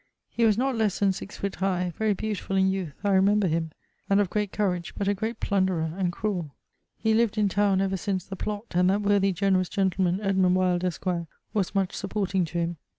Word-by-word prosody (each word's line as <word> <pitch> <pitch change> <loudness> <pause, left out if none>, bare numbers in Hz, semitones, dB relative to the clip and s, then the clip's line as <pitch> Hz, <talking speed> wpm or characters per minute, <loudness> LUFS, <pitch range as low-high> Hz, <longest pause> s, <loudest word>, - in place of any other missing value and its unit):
He 230 - +2
was 215 -2 +4
not 265 +1 +1
lesse 220 -4 +1
than 195 -2 +2
6 195 - -8
foot 200 -1 -3
high: 180 -2 0
very 215 -2 +1
beautifull 205 -1 -3
in 190 0 +4
youth 185 -6 -4
I 200 - +2
remember 200 +2 +4
him: 165 -1 0 0.4
and 200 0 +4
of 200 -3 +1
great 210 -2 -1
courage, 180 -5 -1
but 200 - -1
a 200 - +3
great 220 +3 -4
plunderer 185 -5 0
and 185 -2 0
cruell. 180 -5 -3 0.5
He 220 -1 +1
lived 225 -1 +2
in 210 -1 +3
towne 200 -1 +2
ever 195 0 0
since 190 -1 -2
the 195 - -7
Plott, 205 +3 -4
and 180 +1 +3
that 205 +2 +1
worthy 200 -1 +3
generous 185 0 +1
gentleman 190 -1 +1
Edmund 190 -3 +2
Wyld, 180 -1 +1
esq., 180 +1 -3 0.5
was 200 -1 -1
much 195 -2 +1
supporting 195 -2 -1
to 165 +2 -6
him. 170 0 -1
195 Hz, 215 wpm, -26 LUFS, 180-205 Hz, 0.5 s, was